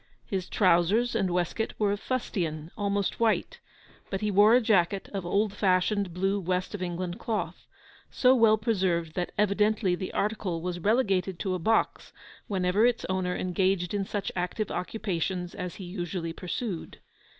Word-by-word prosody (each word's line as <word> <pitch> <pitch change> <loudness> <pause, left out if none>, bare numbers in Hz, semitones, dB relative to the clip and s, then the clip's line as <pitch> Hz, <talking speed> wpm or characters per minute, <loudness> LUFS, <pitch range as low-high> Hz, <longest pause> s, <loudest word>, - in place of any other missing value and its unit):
His 190 -2 -3
trousers 195 +5 +3
and 195 -5 +1
waistcoat 180 +5 -1
were 205 -2 +2
of 205 - -2
fustian, 170 -11 -3
almost 200 -1 -1
white, 230 - +1 0.5
but 195 - -3
he 210 -1 0
wore 205 +4 +6
a - - +6
jacket 200 -4 +2
of 190 -3 -3
old 200 +2 +1
fashioned 190 0 +1
blue 195 +3 0
West 185 +1 -2
of 205 - -5
England 180 +2 -3
cloth, 220 -3 -3 0.4
so 255 0 +4
well 225 -4 +5
preserved 185 -7 0
that 175 +1 -2
evidently 210 -1 +2
the 185 +1 -3
article 200 -5 -1
was 175 +1 -4
relegated 195 -3 +1
to 190 0 -2
a 185 - -2
box 225 +7 0 0.3
whenever 190 +1 +1
its 240 0 +2
owner 185 -1 0
engaged 185 0 0
in 200 -1 0
such 200 +1 -3
active 185 +4 -2
occupations 180 -3 -3
as 180 -1 -5
he 195 - -8
usually 175 -2 -4
pursued. 180 +1 -5
190 Hz, 160 wpm, -28 LUFS, 180-210 Hz, 0.5 s, wore